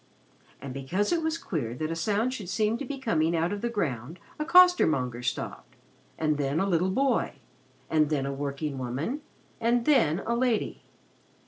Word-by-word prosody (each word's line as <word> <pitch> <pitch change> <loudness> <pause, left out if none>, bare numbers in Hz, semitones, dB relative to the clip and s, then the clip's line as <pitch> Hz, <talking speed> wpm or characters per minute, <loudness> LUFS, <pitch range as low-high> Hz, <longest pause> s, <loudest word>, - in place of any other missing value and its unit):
And, 135 -1 -7
because 155 +10 -1
it 340 -1 +2
was 320 0 -1
queer 130 - -3
that 155 +4 -3
a - - -2
song 210 +8 0
should 210 -9 -6
seem 215 +3 +1
to 280 - -4
be 275 +2 -5
coming 170 -10 +1
out 165 +3 +1
of 205 - -4
the 235 - -1
ground, 150 - -3 0.2
a 305 - -1
costermonger 160 - +5
stopped, 125 - -4 0.4
and 155 -2 0
then 140 +2 0
a 195 - +2
little 180 0 +2
boy, 265 +7 +1 0.5
and 155 -2 +2
then 145 -3 0
a 140 - -2
workingwoman, 140 - -3 0.4
and 235 +1 +2
then 175 - +3
a 235 - 0
lady. 240 -2 0
170 Hz, 170 wpm, -28 LUFS, 140-235 Hz, 0.5 s, costermonger